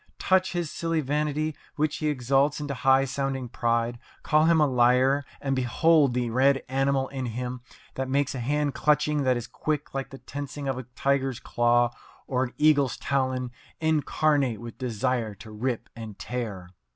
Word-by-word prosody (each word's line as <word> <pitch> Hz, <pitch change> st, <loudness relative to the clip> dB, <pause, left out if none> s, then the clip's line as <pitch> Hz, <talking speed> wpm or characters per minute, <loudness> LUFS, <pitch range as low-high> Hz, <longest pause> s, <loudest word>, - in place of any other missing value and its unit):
Touch 185 Hz, 0 st, +2 dB
his 175 Hz, -3 st, -2 dB
silly 165 Hz, -1 st, -1 dB
vanity, 150 Hz, +1 st, -1 dB, 0.2 s
which 150 Hz, 0 st, 0 dB
he 155 Hz, -, -1 dB
exalts 140 Hz, +1 st, +2 dB
into 145 Hz, -1 st, -3 dB
high 135 Hz, +1 st, +3 dB
sounding 135 Hz, -1 st, -2 dB
pride 115 Hz, 0 st, -1 dB, 0.2 s
call 155 Hz, 0 st, +3 dB
him 165 Hz, 0 st, +4 dB
a 150 Hz, -, +5 dB
liar, 130 Hz, +2 st, +3 dB, 0.2 s
and 135 Hz, -1 st, -1 dB
behold 135 Hz, +2 st, +3 dB
the 120 Hz, -2 st, 0 dB
red 135 Hz, +3 st, +3 dB
animal 135 Hz, 0 st, +1 dB
in 130 Hz, -2 st, -4 dB
him 125 Hz, +2 st, -4 dB, 0.3 s
that 130 Hz, 0 st, -3 dB
makes 140 Hz, 0 st, +1 dB
a 130 Hz, -, -4 dB
hand 145 Hz, +3 st, 0 dB
clutching 150 Hz, 0 st, +2 dB
that 130 Hz, -2 st, +2 dB
is 120 Hz, -, -5 dB
quick 150 Hz, -1 st, -3 dB
like 135 Hz, -1 st, -3 dB
the 135 Hz, -, -10 dB
tensing 145 Hz, +1 st, -6 dB
of 135 Hz, -1 st, -1 dB
a 130 Hz, -, -7 dB
tiger's 135 Hz, -2 st, 0 dB
claw, 120 Hz, 0 st, +2 dB, 0.3 s
or 130 Hz, -1 st, 0 dB
an 120 Hz, -, -9 dB
eagle's 145 Hz, -4 st, +3 dB
talon, 130 Hz, -2 st, -1 dB, 0.3 s
incarnate 150 Hz, -5 st, +1 dB
with 120 Hz, 0 st, -8 dB
desire 120 Hz, -2 st, -1 dB
to 110 Hz, +3 st, -12 dB
rip 120 Hz, +3 st, -3 dB
and 110 Hz, -3 st, -8 dB
tear. 100 Hz, -7 st, -5 dB
135 Hz, 170 wpm, -26 LUFS, 125-145 Hz, 0.3 s, a